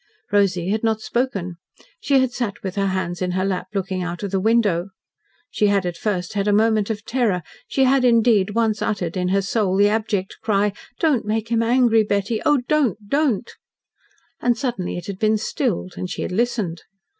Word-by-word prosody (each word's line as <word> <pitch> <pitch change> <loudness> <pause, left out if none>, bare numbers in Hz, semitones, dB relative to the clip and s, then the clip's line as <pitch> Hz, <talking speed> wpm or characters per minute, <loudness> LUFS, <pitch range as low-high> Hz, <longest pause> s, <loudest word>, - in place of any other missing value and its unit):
Rosy 190 -3 +2
had 215 +2 -1
not 220 -1 +1
spoken. 205 -8 -2 0.4
She 275 -1 +2
had 260 -1 +1
sat 240 -5 -4
with 190 -2 -3
her 200 -1 +1
hands 185 -2 -2
in 180 -1 -1
her 185 +1 0
lap, 185 -1 -2
looking 190 -1 -2
out 175 0 -4
of 200 - -3
the 195 - +1
window. 205 -4 +2 0.6
She 210 - +2
had 200 -2 +2
at 175 -1 -2
first 180 -1 -2
had 200 0 -1
a - - +4
moment 215 0 +2
of 215 -1 -4
terror. 220 -9 0 0.2
She 270 - +1
had, 265 0 +3
indeed, 225 -4 +3
once 220 -2 +1
uttered 180 -5 -2
in 180 -1 0
her 195 +1 +1
soul 195 -1 0
the 205 +1 +5
abject 210 -3 -1
cry: 205 -1 +1 0.2
"Don't 300 -7 +2
make 220 +1 -2
him 230 -1 +2
angry, 230 -1 +4
Betty 205 +2 -1
oh, 295 -3 +4
don't, 230 - 0
don't!" 275 -5 +1 0.9
And 240 -1 +2
suddenly 235 -10 -3
it 175 - -6
had 195 -2 -6
been 215 0 +3
stilled, 210 - -2
and 180 - -4
she - - -4
had - - -4
listened. 200 -5 -1
210 Hz, 195 wpm, -22 LUFS, 190-230 Hz, 0.9 s, the